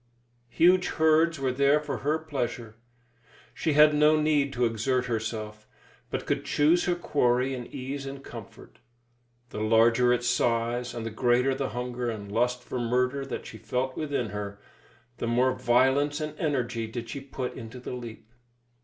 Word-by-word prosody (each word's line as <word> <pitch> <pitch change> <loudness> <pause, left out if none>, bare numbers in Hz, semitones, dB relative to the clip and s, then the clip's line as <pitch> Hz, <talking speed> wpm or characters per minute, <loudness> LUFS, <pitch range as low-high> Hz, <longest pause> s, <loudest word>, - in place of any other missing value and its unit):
Huge 180 +7 +4
herds 160 +1 +3
were 135 -1 0
there 140 +3 +3
for 150 - -4
her 150 +2 +1
pleasure. 125 -7 -4 0.8
She 160 - -1
had 150 +1 +7
no 150 +1 +4
need 150 -2 +2
to 125 -1 +1
exert 125 +3 0
herself, 110 -2 -4 0.4
but - - -4
could - - -1
choose 160 +4 +3
her 175 - +1
quarry 130 -6 +1
in 125 -2 -6
ease 135 +2 -6
and 135 0 -7
comfort. 115 -6 -11 0.7
The - - -5
larger 115 +3 +4
its 120 0 +1
size, 120 0 0
and 115 -1 -4
the 115 - -4
greater 125 +3 +2
the 135 0 -2
hunger 125 +1 -3
and 100 -3 -6
lust 125 +3 0
for 125 - -4
murder 125 +3 0
that - - -5
she 110 - -10
felt 125 +4 -2
within 140 -7 -2
her, 100 -1 -6 0.6
the - - -2
more 125 +2 +2
violence 130 +4 +2
and 155 -1 -4
energy 125 -7 -1
did 115 +1 -6
she 140 - -5
put 130 -2 -5
into 115 +1 -9
the 125 - -7
leap. 115 -3 -8
125 Hz, 165 wpm, -27 LUFS, 115-140 Hz, 0.8 s, had